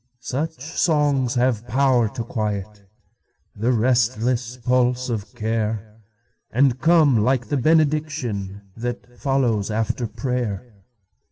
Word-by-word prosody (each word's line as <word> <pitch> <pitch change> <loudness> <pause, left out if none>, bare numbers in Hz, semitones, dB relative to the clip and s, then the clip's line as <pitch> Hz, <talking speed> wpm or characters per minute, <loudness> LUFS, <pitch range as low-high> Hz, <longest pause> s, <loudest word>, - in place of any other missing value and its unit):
Such 150 +3 -3
songs 145 -4 +1
have 120 -2 +1
power 125 -2 +3
to 115 - -2
quietThe 105 -4 -2 1.1
restless 120 +1 +1
pulse 125 +1 +1
of 105 -3 -4
care, 110 -1 -3 0.5
And 130 +1 +2
come 160 -7 +5
like 125 -1 +1
the 145 - +1
benedictionThat 120 -7 -1
follows 125 -7 +1
after 110 +2 -1
prayer. 120 -3 -3
125 Hz, 95 wpm, -22 LUFS, 110-135 Hz, 1.1 s, come